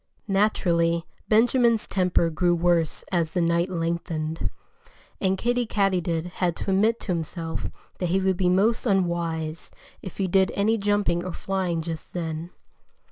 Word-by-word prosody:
Naturally, 170 -5 +2 0.2
Benjamin's 230 0 +3
temper 180 -3 +1
grew 175 +2 +2
worse 170 -2 +1
as 170 -4 0
the - - +2
night 170 +2 +2
lengthened. 165 - -2 0.7
And 190 0 +1
Kiddie 245 +2 0
Katydid 180 -6 0 0.2
had 175 -2 +2
to 195 - -3
admit 220 +4 +3
to - - -10
himself 165 -1 -3 0.3
that 180 - -1
he 190 +3 +2
would 190 0 +1
be 180 0 +1
most 215 +7 +2
unwise 170 -5 -1 0.3
if 190 - -9
he 195 - 0
did 190 +1 +3
any 215 +3 +2
jumping 200 -4 +1
or 185 -1 -5
flying 185 -5 -2
just 160 -1 -6
then. 165 -1 -4
180 Hz, 145 wpm, -25 LUFS, 170-195 Hz, 0.7 s, Benjamin's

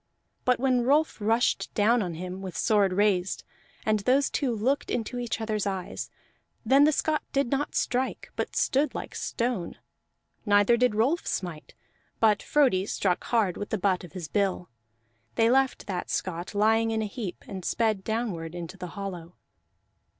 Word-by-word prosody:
But 250 -1 +3
when 255 -1 +2
Rolf 290 -1 +2
rushed 225 +3 +1
down 230 +3 +4
on 175 -4 -3
him, 180 +3 -6
with 185 -3 -6
sword 205 -4 +3
raised, 190 -1 +1 0.4
and 215 -1 +2
those 260 +7 +2
two 275 -4 0
looked 255 +7 0
into 245 +1 -2
each 240 -2 -2
other's 215 -2 -1
eyes, 190 -2 -4 0.6
then 270 +5 +6
the 305 - +5
Scot 310 +1 0
did 275 -3 0
not 280 +1 -1
strike, 255 +1 -1
but - - -3
stood 275 +1 +1
like - - -5
stone. 235 -8 -2 0.7
Neither 205 +2 +4
did 245 -2 +2
Rolf 265 +11 +1
smite, 175 -5 -4 0.4
but 215 -2 +4
Frodi 245 -10 +2
struck 185 -4 0
hard 215 -7 +1
with 205 - -5
the 220 - 0
butt 190 -1 +1
of 175 - -11
his 175 -4 -6
bill; 190 -3 -1 0.6
they 230 0 +4
left 265 0 +2
that 185 -3 -4
Scot 175 +1 -3
lying 225 +2 +3
in 220 -1 0
a - - -1
heap, 205 -3 -6
and 190 -2 -6
sped 215 -2 0
downward 190 -8 -3
into 175 +2 -7
the 180 -1 -6
hollow. 180 -4 -6
215 Hz, 165 wpm, -27 LUFS, 185-245 Hz, 0.7 s, then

